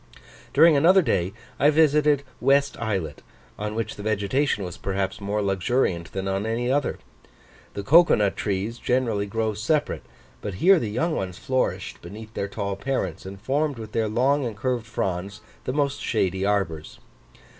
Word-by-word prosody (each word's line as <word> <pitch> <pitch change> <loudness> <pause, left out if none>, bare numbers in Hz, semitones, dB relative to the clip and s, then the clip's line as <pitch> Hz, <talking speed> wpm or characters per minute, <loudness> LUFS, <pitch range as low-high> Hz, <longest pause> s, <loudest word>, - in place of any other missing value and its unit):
During 160 +2 +6
another 175 +6 +5
day 90 - 0 0.3
I 145 - +5
visited 150 -2 +3 0.2
West 140 +2 +3
Islet, 95 -10 -3 0.4
on 105 +1 -3
which 115 -1 -3
the - - -7
vegetation 105 +3 0
was 90 -2 -6
perhaps 95 0 -3
more 105 +1 -1
luxuriant 95 -2 0
than 95 0 -3
on 95 +2 -1
any 120 +2 -1
other. 145 +1 0 0.8
The 100 - -4
cocoa 170 +10 +6
nut 100 -2 +1
trees 105 +3 -2
generally 115 -5 0
grow 110 +1 -1
separate, 145 +9 0 0.4
but 100 -3 -5
here 185 - +5
the 110 - -3
young 155 +10 0
ones 90 -2 -4
flourished 130 -1 -2
beneath 110 +5 -10
their 100 - -2
tall 100 -1 -3
parents, 100 - -3
and 95 0 -8
formed 140 +5 -1
with 110 -1 -8
their 110 -1 0
long 135 +6 +2
and 115 -4 -4
curved 120 0 -2
fronds 100 +1 -3 0.2
the 125 - -2
most 140 -1 0
shady 95 -4 0
arbours. 90 -7 -1
110 Hz, 165 wpm, -24 LUFS, 100-135 Hz, 0.8 s, During